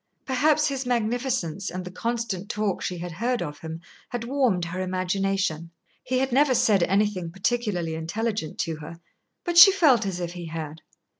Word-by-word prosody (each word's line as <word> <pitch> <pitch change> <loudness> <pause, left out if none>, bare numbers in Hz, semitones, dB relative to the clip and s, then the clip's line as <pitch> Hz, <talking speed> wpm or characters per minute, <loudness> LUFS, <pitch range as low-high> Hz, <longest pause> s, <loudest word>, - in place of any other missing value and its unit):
Perhaps 295 +4 +3
his 270 -2 -3
magnificence 235 - -1
and 180 +1 -5
the 180 - -7
constant 225 -2 -3
talk 210 -3 -1
she 180 - -3
had 175 +1 -6
heard 235 +8 -1
of 145 0 -7
him 160 0 -7 0.3
had 245 -1 -4
warmed 240 -9 +1
her 180 +2 -4
imagination. 185 -2 -1 0.3
He 255 0 -1
had 265 0 0
never 270 +1 +4
said 205 -5 +3
anything 195 -1 +1
particularly 195 -3 -1
intelligent 170 +2 -3
to 160 -1 -3
her, 160 +2 -10 0.4
but 345 -1 +4
she 390 +2 +11
felt 280 - +4
as 185 -2 -3
if 175 -1 -4
he 175 -2 -7
had. 160 -1 -6
195 Hz, 170 wpm, -25 LUFS, 175-245 Hz, 0.4 s, she